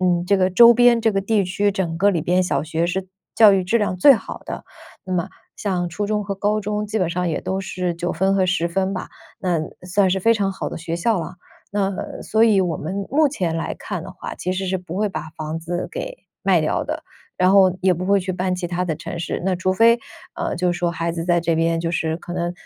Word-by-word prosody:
嗯， 175 -1 +2
这 200 +1 +3
个 185 0 +3
周 235 +6 +8
边 240 0 +5
这 225 -1 +3
个 195 - +1
地 200 0 +1
区， 200 +3 +1
整 175 -4 -2
个 200 - +4
里 175 -6 +1
边 180 +3 +2
小 180 - 0
学 165 +2 -1
是 190 +2 -2 0.3
教 220 -3 +7
育 190 -1 +2
质 195 +6 +2
量 205 -4 0
最 275 +9 +8
好 - - -7
的。 - - -6 0.4
那 185 - -5
么， 175 -2 0 0.3
像 180 -4 -2
初 205 +4 -3
中 210 -1 -1
和 200 - -3
高 205 +2 0
中， 210 0 -2
基 215 +1 -2
本 180 -3 0
上 180 0 -1
也 160 - -1
都 190 +1 -2
是 180 -2 -3
9 175 +1 -3
分 190 +3 +2
和 190 -1 +2
10 180 -2 +1
分 190 +3 -1
吧， 185 - -6 0.3
那 175 -4 0 0.3
算 190 +1 +2
是 190 +1 +1
非 230 +5 +4
常 200 -3 0
好 190 - -5
的 - - -6
学 165 0 -4
校 200 +2 +1
了。 165 - -6 0.4
那 195 -1 -2
所 220 +1 +2
以 215 -4 +4
我 175 -4 0
们 195 +7 -4
目 295 0 +3
前 170 - -2
来 165 - -3
看 - - -5
的 - - -9
话， - - -7
其 180 - -3
实 190 +1 -3
是 190 +1 0
不 180 -2 -8
会 215 - +1
把 160 -5 -6
房 155 +1 -3
子 170 +2 -4
给 - - -6 0.2
卖 - - +3
掉 - - 0
的， - - -4 0.4
然 185 0 +4
后 190 -2 +5
也 185 -1 +3
不 180 +2 -4
会 200 +1 +3
去 185 0 -4
搬 185 0 -1
其 180 -1 -3
他 175 +1 -2
的 165 -3 -1
城 160 +2 -7
市。 170 - -3
那 185 -1 0
除 185 +1 0
非， 230 +4 +5 0.4
呃， - - -2
就 180 0 +1
说 175 -1 0
孩 170 0 -2
子 165 -1 -4
在 175 -1 +2
这 170 0 0
边， 165 0 +1
就 165 - -2
是 160 -2 -1
可 175 - -8
能 175 -1 -2
185 Hz, 265 characters per minute, -21 LUFS, 175-200 Hz, 0.4 s, 周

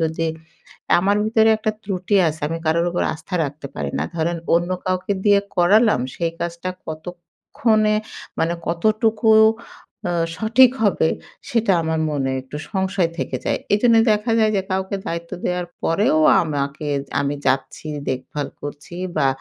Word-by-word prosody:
যদি 160 0 0 0.7
আমার 200 +3 +2
ভিতরে 220 0 +3
একটা 215 0 -1
ত্রুটি 195 0 -2
আছে 155 0 -6
আমি 165 +1 -3
কারোর 170 +2 +2
উপর 175 - -1
আস্থা 160 +4 -8
রাখতে 145 0 -6
পারি 70 -1 -3
না। 75 - 0
ধরেন 170 +1 -1 0.2
অন্য 175 +2 +1 0.2
কাউকে 185 +2 0
দিয়ে 205 -1 +5 0.2
করালাম 205 - +4 0.2
সেই 165 -1 -1
কাজটা 170 +2 -3 0.2
কতক্ষণে 180 +7 -1 0.4
মানে 165 +1 +1
কতটুকু 215 +5 +1 0.8
আ - - -1 0.2
সঠিক 235 +5 +5
হবে 185 -6 +3 0.4
সেটা 230 -4 +2
আমার 160 0 -1
মনে 135 -2 -1
একটু 130 +3 -9 0.2
সংশয় 190 -3 0
থেকে - - -2
যায়। - - 0 0.2
এজন্য 230 +2 +4 0.2
দেখা 210 +3 -1
যায় 220 -1 +4
যে, 190 - +1
কাউকে 190 +1 -1
দায়িত্ব 170 0 -4
দেওয়ার 180 0 -1 0.2
পরেও 220 - +2 0.2
আমাকে 145 -1 -3 0.3
আমি 140 +1 -1
যাচ্ছি, 135 +3 -1 0.2
দেখভাল 135 +2 -4
করছি 145 +3 -8 0.2
বা 145 -3 +3
175 Hz, 145 wpm, -21 LUFS, 160-210 Hz, 0.8 s, দিয়ে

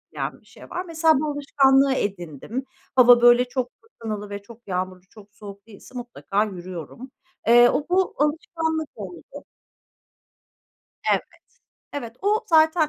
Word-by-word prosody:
yen - - -4
bir - - -30
şey - - -16
var. 360 +1 -4
Mesela 320 -1 +3
bu 310 - -1
alışkanlığı 275 -1 +3
edindim. 200 - -4 0.3
Hava 245 -1 +7
böyle 240 +1 +6
çok 250 0 -3
fırtınalı 215 - -7
ve 200 0 -6
çok 230 +2 -16
yağmurlu, 185 0 -3
çok 205 -2 -17
soğuk 200 0 -11
değilse 225 +4 -15
mutlaka 225 -4 -2
yürüyorum. 185 - -8 0.4
Eee, 240 +1 +7
o 290 - 0
bu 370 +1 +1
alışkanlık 320 +1 -1
oldu. 195 - -10 1.7
Evet. - - +3 0.7
Evet 235 -5 -6
o 420 +3 +1
zaten 315 -1 +4
245 Hz, 135 wpm, -23 LUFS, 205-295 Hz, 1.7 s, Hava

